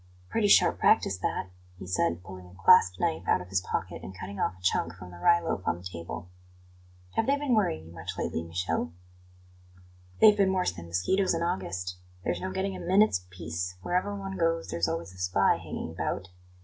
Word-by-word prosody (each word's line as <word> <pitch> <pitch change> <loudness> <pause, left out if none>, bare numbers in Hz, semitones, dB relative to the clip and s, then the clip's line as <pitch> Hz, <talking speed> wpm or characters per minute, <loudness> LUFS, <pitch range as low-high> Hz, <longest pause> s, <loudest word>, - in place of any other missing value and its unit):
"Pretty 215 -2 +2
sharp - - +5
practice 95 - +4
that," 90 0 -2 0.3
he 90 - -8
said, 85 -1 0
pulling 95 -1 -10
a 95 +2 -16
clasp 90 0 +6
knife 80 +3 -1
out - - +4
of 90 - -9
his 95 -1 +1
pocket - - -4
and 95 - -9
cutting 100 +2 -7
off 95 - 0
a - - -20
chunk 85 -2 +1
from 90 0 -11
the 85 - -11
rye 170 - +5
loaf 165 - -2
on - - +1
the 90 - -13
table. 85 0 -7 0.8
"Have 225 - 0
they 280 +1 +3
been 285 -3 0
worrying 135 - +1
you 80 - -12
much 80 -2 -6
lately, - - -2
Michele?" 85 -1 -2 1.3
"They've 210 -1 +8
been 195 -2 +3
worse 185 -1 +1
than 85 0 -10
mosquitos 170 - +1
in 165 - -1
August. 90 - -3 0.3
There's - - -1
no 185 - -2
getting 190 +1 -2
a - - -7
minute's 180 - +3
peace; 90 0 -4
wherever 185 - 0
one 195 -1 -5
goes, 165 0 0
there's 85 +1 0
always 85 +2 -4
a 90 - -14
spy 90 0 +3
hanging - - -6
about. 90 - -3
90 Hz, 200 wpm, -28 LUFS, -, 1.3 s, They've